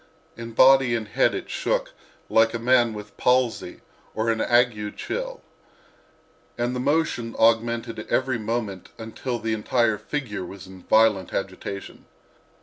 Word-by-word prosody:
In 115 0 -8
body 130 0 +6
and 110 -2 -3
head 105 - +2
it - - -5
shook - - -1 0.4
like 115 +1 +3
a - - +1
man 120 -1 +3
with 105 0 -9
palsy 125 -2 +1 0.3
or 110 +1 +1
an 110 0 -1
ague 120 -4 +1
chill, - - -5 1.1
and 120 +1 -1
the - - -2
motion 135 -5 0
augmented 115 0 +2
every 130 -2 +1
moment 110 -4 -3
until 115 +2 -4
the 110 -1 -2
entire 110 0 +1
figure 125 -10 -4
was 95 +1 -9
in 95 -1 -13
violent 110 -2 +3
agitation. 100 0 -6
115 Hz, 140 wpm, -24 LUFS, 110-125 Hz, 1.1 s, body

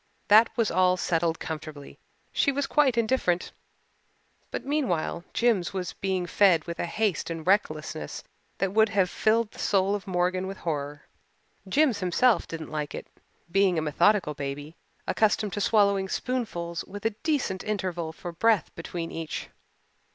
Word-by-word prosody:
That 220 +3 +7
was 230 -3 +2
all 185 +1 +3
settled 165 -2 0
comfortably 155 -2 -7 0.3
she 280 - +2
was 280 +1 -1
quite 270 -4 +2
indifferent 220 -7 +1 1.0
but - - -5
meanwhile 200 - -1
Jims 220 -7 +1
was 185 -2 -3
being 190 -2 -2
fed 175 -3 +4
with 170 -1 -6
a - - -1
haste 205 -1 -1
and 165 -1 -5
recklessness 155 - -1 0.3
that 195 0 -1
would 220 0 +4
have 195 -3 +1
filled 225 0 +1
the - - -14
soul 195 0 +2
of 205 -1 -4
Morgan 185 0 0
with 195 0 -6
horror. 145 -2 -4 0.7
Jims 270 -2 +3
himself 200 +6 +2
didn't 160 -1 -7
like 150 -1 -3
it, - - -6 0.5
being 195 -2 +3
a - - +1
methodical 155 +2 +2
baby, 145 +2 -6 0.3
accustomed 210 -2 +1
to 205 - -2
swallowing 200 -2 +3
spoonfuls 175 -11 -3
with 205 +2 -9
a 225 - +3
decent 285 - -1
interval 185 -6 -2
for 175 +2 -7
breath 210 +2 +2
between 165 0 -5
each. 165 -1 -5
185 Hz, 150 wpm, -27 LUFS, 165-215 Hz, 1.0 s, That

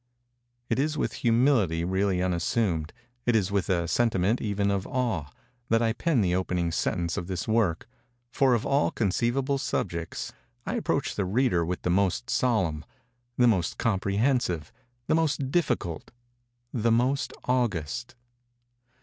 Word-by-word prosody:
It 115 - 0
is 150 +2 0
with - - -1
humility 115 - +3
really 95 0 +1
unassumed—it 110 +6 -1
is 100 -3 +1
with 100 -4 0
a 85 -2 +1
sentiment 110 +1 +1
even 100 -1 0
of 100 -1 -1
awe—that 120 - -2
I 115 -1 +2
pen 145 0 +1
the 90 -3 +1
opening 90 -2 0
sentence 85 0 -1
of 85 - -3
this 95 -2 -3
work: 110 -6 +1 0.4
for 135 -3 +3
of 115 - -2
all 140 +1 +2
conceivable 120 +6 0
subjects 85 - -3 0.3
I - - -2
approach - - -1
the 100 - -1
reader 100 -3 +2
with 90 +2 -3
the 90 - +1
most 100 +6 +1
solemn—the 120 - -1
most 95 -7 +1
comprehensive—the 115 - -1
most 145 -4 +1
difficult—the 120 - -3
most 125 +4 +1
august. 120 - -1
115 Hz, 125 wpm, -27 LUFS, 90-125 Hz, 0.4 s, humility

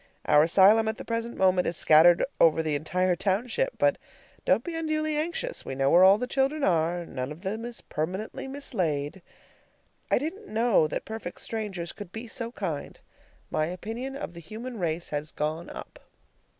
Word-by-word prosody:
Our 150 - +6
asylum 200 +7 +5
at 220 +1 -1
the - - -8
present 230 +1 -3
moment 185 -1 +3
is 170 - -2
scattered 165 +3 +6
over 160 0 +5
the 155 -1 -1
entire 180 +5 +1
township; 235 - -1
but - - +2 0.5
don't - - +3
be 345 - -5
unduly 310 -1 -1
anxious. 345 +11 -3
We - - -5
know 135 +1 +2
where 175 +2 +7
all 190 +2 +8
the 250 - -2
children 270 +3 0
are. 170 -2 +1
None 130 -2 -5
of 160 +5 -10
them 215 +4 -3
is 240 -1 -6
permanently 185 - -4
mislaid. 180 - -2 0.9
I - - +4
didn't 335 - -4
know 220 -7 +3
that - - -4
perfect 220 -5 -6
strangers 195 -6 -4
could 205 -4 -10
be 225 +3 -6
so 230 +1 -4
kind. 170 -11 -5 0.5
My 155 - +1
opinion 225 +9 -5
of 225 - -6
the 170 - -9
human 225 +7 -7
race 170 -1 -2
has 150 +1 -3
gone 155 +3 -3
up. - - -10
190 Hz, 175 wpm, -27 LUFS, 165-240 Hz, 0.9 s, all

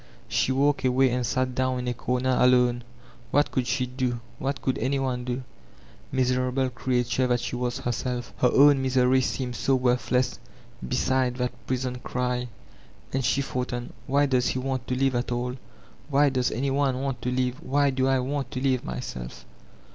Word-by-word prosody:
She - - +1
walked 140 +2 +2
away 130 0 +3
and 125 +1 0
sat 130 +2 0
down 130 0 0
in 125 0 -4
a 125 - 0
comer 125 +2 0
akme; 125 -1 +4 0.5
what 145 +1 +2
could 125 -2 -1
she 130 -1 0
do, 125 -1 -2 0.2
what 135 +1 -2
couM 130 - -1
any 135 +4 +1
one 130 -2 -1
do? 125 +1 -3 0.7
Mia* 130 -1 +2
erable 125 +1 0
creature 125 0 0
that 125 -1 +2
she 120 - -4
was 125 0 -2
herself, 120 +1 -3
her 125 - +4
own 140 0 +6
misery 130 0 +3
seemed 125 -1 -2
so 135 +5 +2
worthless 125 0 +1 0.5
beside 130 0 +1
that 125 -1 -2
prison 125 -1 -2
cry. 125 0 -2 0.7
And 135 0 0
she 135 +3 +2
thought 125 -2 -3
on, 120 0 -5
"Why 140 +1 +3
does 130 -3 +2
he - - 0
want 130 -1 -3
to 130 - -1
live 135 0 +2
at 120 0 -1
all, 125 +1 -2 0.5
why 145 0 +4
does 130 -2 +1
any 135 +4 -1
one 135 -2 +1
want 135 -2 -3
to 125 - -1
live, 125 0 -1
why 140 +1 +2
do 130 0 +1
I 135 0 +3
want 135 0 -2
to 130 - -2
live 130 -2 +1
myself?" 60 -1 -6
130 Hz, 185 wpm, -26 LUFS, 125-130 Hz, 0.7 s, own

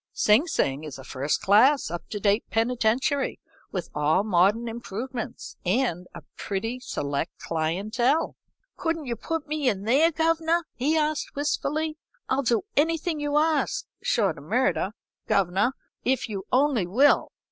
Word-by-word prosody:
'Sing 220 +11 +4
Sing 140 - 0
is 150 -4 -7
a 135 - -10
first 140 +3 -2
class, 230 - +5
up 175 - -6
to 210 - -4
date 205 +2 +2
penitentiary, 245 +4 +1 0.3
with 185 -3 -3
all 150 +6 +2
modern 210 +4 +3
improvements, 235 +2 -6
and 180 -3 0
a - - -9
pretty 225 +5 -3
select 145 - -3
clientele.' 215 - 0 0.4
"'Couldn't 330 -3 -2
you 240 -2 -2
put 325 +4 -4
me 300 -3 +1
in 200 -4 -2
there, 280 +10 +4
governor?' 330 +1 +1
he 295 +6 +1
asked, 305 -1 -1
wistfully. 305 +2 -1 0.3
'I'll 265 +1 +2
do 240 +3 +1
anything 325 +1 +1
you 290 0 0
ask, 320 +10 +1 0.2
short - - +1
o' - - -12
murder, - - 0 0.3
governor, 195 +6 +2 0.3
if 260 0 +1
you 200 -3 -5
only 255 -8 +2
will.' 260 +11 +4
245 Hz, 145 wpm, -26 LUFS, 195-295 Hz, 0.4 s, class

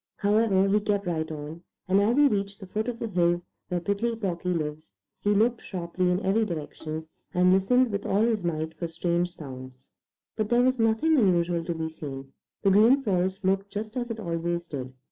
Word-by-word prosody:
However, 205 -2 +3
he 205 +2 +3
kept 205 -1 -1
right 160 -2 -2
on, 155 +2 -7 0.3
and 190 +2 +4
as 225 +5 +2
he 290 0 +7
reached 200 -3 -2
the 195 - -8
foot 215 +5 -3
of 240 -2 -3
the 230 - -3
hill 175 -3 +1 0.2
where 180 -1 -1
Prickly 200 +6 -1
Porky 180 -5 -3
lives, 155 - -3 0.3
he 205 - -1
looked 225 +3 +2
sharply 180 0 -2
in 180 0 +2
every 205 +4 +3
direction 160 -3 -5 0.3
and 180 +1 +5
listened 245 +6 +3
with 200 0 -3
all 200 +3 +2
his 225 -4 +1
might 160 -1 -2
for 170 - -4
strange 175 +1 -1
sounds. 130 -3 -10 0.5
But 215 -1 -1
there 240 +1 +4
was 255 0 +2
nothing 225 +8 +3
unusual 175 -4 +2
to 170 - -2
be 160 0 -2
seen. 135 -4 -8 0.3
The 195 - +4
Green 230 +8 +5
Forest 190 -2 0
looked 195 +1 +1
just 215 +3 -5
as 245 -1 -2
it 230 -1 -4
always 170 -2 -2
did. 130 -4 -5
190 Hz, 200 wpm, -27 LUFS, 170-215 Hz, 0.5 s, he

